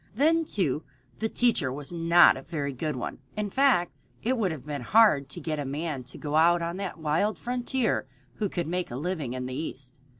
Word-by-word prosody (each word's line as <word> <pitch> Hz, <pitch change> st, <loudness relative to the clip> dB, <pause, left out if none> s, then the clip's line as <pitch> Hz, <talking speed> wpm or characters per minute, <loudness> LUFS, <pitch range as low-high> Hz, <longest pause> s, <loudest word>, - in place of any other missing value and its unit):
Then, 320 Hz, +6 st, +3 dB
too, 160 Hz, -, -1 dB, 0.4 s
the 220 Hz, -, 0 dB
teacher 220 Hz, -, +1 dB
was 145 Hz, +4 st, -6 dB
not 170 Hz, +1 st, +6 dB
a 135 Hz, -, -7 dB
very 140 Hz, -2 st, -3 dB
good 150 Hz, +4 st, -3 dB
one. 125 Hz, -, -5 dB, 0.2 s
In 210 Hz, -1 st, -2 dB
fact, 260 Hz, -10 st, +3 dB, 0.3 s
it 250 Hz, +4 st, +1 dB
would 215 Hz, -6 st, +1 dB
have 150 Hz, -4 st, -7 dB
been 145 Hz, -2 st, -4 dB
hard 155 Hz, -, +4 dB
to 175 Hz, -, -8 dB
get 155 Hz, -1 st, -3 dB
a -, -, -1 dB
man 140 Hz, 0 st, -3 dB
to 130 Hz, -, -7 dB
go 150 Hz, 0 st, -1 dB
out 170 Hz, +1 st, +4 dB
on 170 Hz, +2 st, -3 dB
that 195 Hz, -2 st, -4 dB
wild 160 Hz, +7 st, 0 dB
frontier 245 Hz, -, -1 dB, 0.3 s
who 210 Hz, -2 st, -1 dB
could 175 Hz, -2 st, -2 dB
make 180 Hz, +3 st, -2 dB
a 120 Hz, -, -6 dB
living 150 Hz, -3 st, -3 dB
in 130 Hz, 0 st, -4 dB
the 130 Hz, -, -5 dB
East. 135 Hz, -3 st, -6 dB
165 Hz, 210 wpm, -27 LUFS, 145-205 Hz, 0.4 s, not